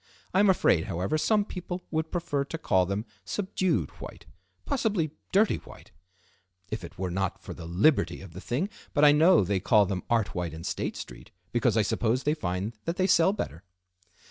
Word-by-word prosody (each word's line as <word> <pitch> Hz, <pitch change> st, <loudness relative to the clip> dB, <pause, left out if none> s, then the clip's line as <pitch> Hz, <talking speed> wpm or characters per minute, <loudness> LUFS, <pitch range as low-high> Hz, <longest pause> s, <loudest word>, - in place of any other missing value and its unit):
I 190 Hz, -, +3 dB
am 205 Hz, 0 st, +5 dB
afraid, 95 Hz, -, +3 dB
however, 90 Hz, -, -1 dB
some 210 Hz, +4 st, +2 dB
people 180 Hz, -2 st, -6 dB
would 160 Hz, 0 st, -1 dB
prefer 145 Hz, -5 st, -1 dB
to 165 Hz, -, -5 dB
call 95 Hz, -, +2 dB
them 100 Hz, +3 st, -2 dB, 0.2 s
subdued 185 Hz, -, -1 dB
white; -, -, -9 dB, 0.4 s
possibly 210 Hz, -, 0 dB, 0.2 s
dirty 205 Hz, +3 st, +3 dB
white, -, -, -14 dB, 0.8 s
if 110 Hz, -3 st, -3 dB
it 85 Hz, -, -10 dB
were 90 Hz, -1 st, -2 dB
not 95 Hz, +1 st, -2 dB
for -, -, -8 dB
the 80 Hz, -, -9 dB
liberty 85 Hz, -, +2 dB
of 95 Hz, -4 st, -11 dB
the 95 Hz, -, -8 dB
thing, 130 Hz, -, -1 dB, 0.3 s
but 150 Hz, 0 st, +5 dB
I 145 Hz, -, +9 dB
know 160 Hz, -, +5 dB
they 95 Hz, +1 st, 0 dB
call 105 Hz, +2 st, +4 dB
them 95 Hz, -1 st, -2 dB
art 110 Hz, -6 st, +1 dB
white 90 Hz, -4 st, -3 dB
in 80 Hz, -, -8 dB
State -, -, -3 dB
Street, -, -, -9 dB, 0.2 s
because 120 Hz, -1 st, +2 dB
I 110 Hz, -, +4 dB
suppose 115 Hz, +4 st, 0 dB
they 150 Hz, -, +2 dB
find 95 Hz, -, -3 dB
that 165 Hz, -, -1 dB
they 185 Hz, -, +1 dB
sell 185 Hz, -1 st, +5 dB
better." 85 Hz, -, -5 dB
120 Hz, 195 wpm, -28 LUFS, -, 0.8 s, I